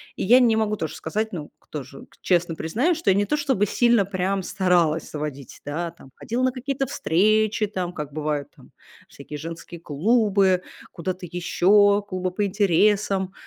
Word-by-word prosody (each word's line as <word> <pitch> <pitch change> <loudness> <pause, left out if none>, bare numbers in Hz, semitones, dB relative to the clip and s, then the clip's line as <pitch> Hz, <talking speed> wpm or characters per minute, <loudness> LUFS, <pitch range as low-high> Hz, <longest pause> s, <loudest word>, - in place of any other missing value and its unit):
и - - -3
я 245 +6 +6
не 235 -3 +4
могу 215 -1 0
тоже 160 -7 -4
сказать, 215 +7 -3
ну, 155 -4 -6
кто 150 -2 -8
же 135 +1 -12
к - - -26
честно 175 -2 +1
признаюсь, 250 - 0
что 330 - 0
я 190 - +5
не 205 - +2
то 300 - 0
чтобы 270 -9 +1
сильно 235 -1 +3
прям 190 0 -1
старалась 180 -4 +1
заводить, 145 -3 -6
да, 165 +4 -3
там, 135 - -17
ходила 245 +3 -3
на 255 - +3
какие-то 270 +1 -3
встречи 215 0 +1
там, 185 -4 -4
как 150 -2 -6
бывают 150 -2 -2
там - - -18 0.4
всякие 145 +1 -9
женские 165 +2 -8
клубы, 195 - +2 0.3
куда-то 180 +2 -5
еще, 200 +4 +3
клубы 185 -1 -2
по 205 +3 -1
интересам. 195 0 +1
190 Hz, 175 wpm, -23 LUFS, 165-215 Hz, 0.4 s, я